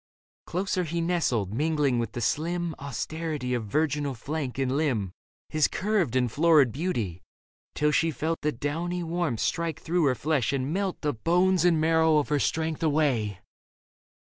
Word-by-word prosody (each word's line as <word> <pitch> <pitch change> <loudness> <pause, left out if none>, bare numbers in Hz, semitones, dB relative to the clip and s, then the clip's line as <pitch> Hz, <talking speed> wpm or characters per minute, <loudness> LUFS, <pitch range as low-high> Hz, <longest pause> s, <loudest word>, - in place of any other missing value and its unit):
Closer 185 +1 -1
he 170 +1 -3
nestled, 150 - 0
mingling 145 -2 +1
with 115 -2 -3
the 120 - -4
slim 170 +6 -1
Austerity 145 -1 -3
of 115 -3 -2
virginal 145 +2 0
flank 140 +1 -4
and 135 -1 0
limb 125 - 0 0.4
His 155 -1 +3
curved 190 - 0
and 125 -3 +2
florid 150 -3 +4
beauty, 115 - -2 0.5
till 150 0 +2
she 165 +2 +2
felt 160 +1 -2
That 150 -5 -2
downy 175 +5 -2
warmth 165 -8 -1
strike 165 -2 -1
through 170 0 +1
her 130 -2 +3
flesh 140 -2 0
and 135 +2 -1
melt 195 -1 -2
The 150 -1 0
bones 180 - +2
and 170 -3 +4
marrow 160 0 +4
of 145 - 0
her 150 -1 +2
strength 160 +2 -1
away. 140 - +1
155 Hz, 160 wpm, -27 LUFS, 130-165 Hz, 0.5 s, florid